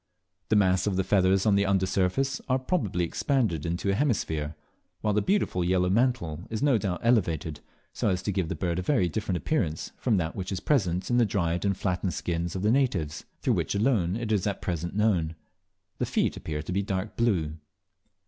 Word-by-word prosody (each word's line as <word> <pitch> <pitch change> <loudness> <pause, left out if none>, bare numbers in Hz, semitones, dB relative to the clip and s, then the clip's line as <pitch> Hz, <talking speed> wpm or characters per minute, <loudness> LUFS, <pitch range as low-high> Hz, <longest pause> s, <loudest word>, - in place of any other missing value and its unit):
The 110 - +3
mass 95 -2 +3
of 95 -2 0
feathers 95 0 +3
on 105 - +4
the 100 0 +3
under 95 -1 +2
surface 100 +10 0
are 130 - +3
probably 130 - -1
expanded 85 - 0
into 85 +4 -1
a - - +1
hemisphere, 80 - 0 0.5
while 105 -1 +1
the 105 - +2
beautiful 185 - +1
yellow 90 +1 +2
mantle 100 -8 0
is 110 +4 -3
no 135 -6 +4
doubt 90 -5 -2
elevated 85 -10 +1 0.3
so - - 0
as 90 0 -1
to 105 - -1
give 90 -4 -1
the - - -2
bird 90 -1 -1
a - - 0
very 95 -3 +2
different 95 +1 -2
appearance 90 - -1
from 115 -5 +1
that 80 -2 -2
which 95 -1 -4
it 95 - -4
presents 95 - +1
in 120 - +3
the 120 - +5
dried 90 -2 0
and 100 -1 +1
flattened 90 -1 -1
skins 85 0 -2
of 95 - -3
the 105 - +3
natives, 95 - 0 0.2
through - - +2
which - - -1
alone 100 -5 +2
it 115 -1 -3
is 105 -2 +1
at 100 - -2
present 85 0 -3
known. 90 -7 +1 0.6
The - - 0
feet - - +1
appear 75 -2 -4
to 80 - -6
be 95 +2 +1
dark 100 +1 -3
blue. 85 -10 0
95 Hz, 205 wpm, -27 LUFS, 85-110 Hz, 0.6 s, the